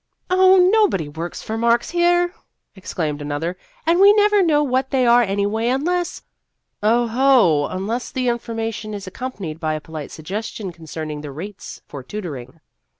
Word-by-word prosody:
" - - -55
Oh, 375 +1 +6 0.2
nobody 405 - +2
works 160 +4 -6
for 220 +1 -4
marks 235 +1 +2
here," 350 0 +2 0.4
exclaimed 155 -6 -4
another, 145 +4 -3 0.2
" - - -33
and 335 +2 +3
we 400 +1 +8
never 415 -1 +4
know 305 -5 +3
what 260 -1 0
they 260 -2 +2
are 240 +1 +6
anyway, 205 +2 0
unless 345 +7 -1 0.3
" - - -55 0.2
Oho! 235 - +3
unless 220 +7 -3
the 255 -1 -2
information 225 -2 -3
is 200 -1 -7
ac - - -7
companied 200 -11 -6
by 155 -1 -1
a - - -3
polite 155 -1 -8
suggestion 195 +4 -5
con 165 -1 -15
cerning 155 -1 -5
the 150 - -7
rates 190 +8 -9
for 140 - -8
tutoring." 145 -4 -7
220 Hz, 170 wpm, -21 LUFS, 160-265 Hz, 0.4 s, we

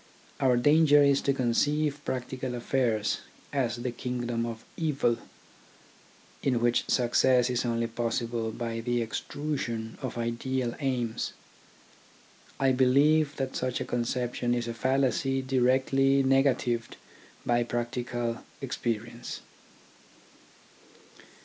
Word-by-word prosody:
Our 125 -2 +3
danger 145 +2 +6
is 140 -1 +4
to 140 - +2
conceive 145 +3 +1
practical 130 0 -3
affairs 120 -3 0 0.3
as 125 -5 0
the 120 +1 -3
kingdom 120 -1 -2
of 115 -1 -7
evil, 145 -7 +1 1.2
in 125 -3 +1
which 120 0 +1
success 125 0 +3
is 125 0 0
only 115 -1 0
possible 115 0 -2
by 115 0 -4
the 120 +1 0
extrusion 115 -2 -4
of 130 -3 -4
ideal 120 +1 -2
aims. 125 -5 -1 1.3
I 135 -1 +4
believe 140 +4 +4
that 135 -1 -3
such 130 0 -1
a - - -3
conception 120 0 -1
is 120 -1 -2
a 115 - -3
fallacy 135 +2 +1
directly 135 +1 +3
negatived 130 -3 +1 0.5
by 120 0 +2
practical 120 0 -2 0.2
experience. 115 +1 -4
125 Hz, 105 wpm, -28 LUFS, 120-135 Hz, 1.3 s, danger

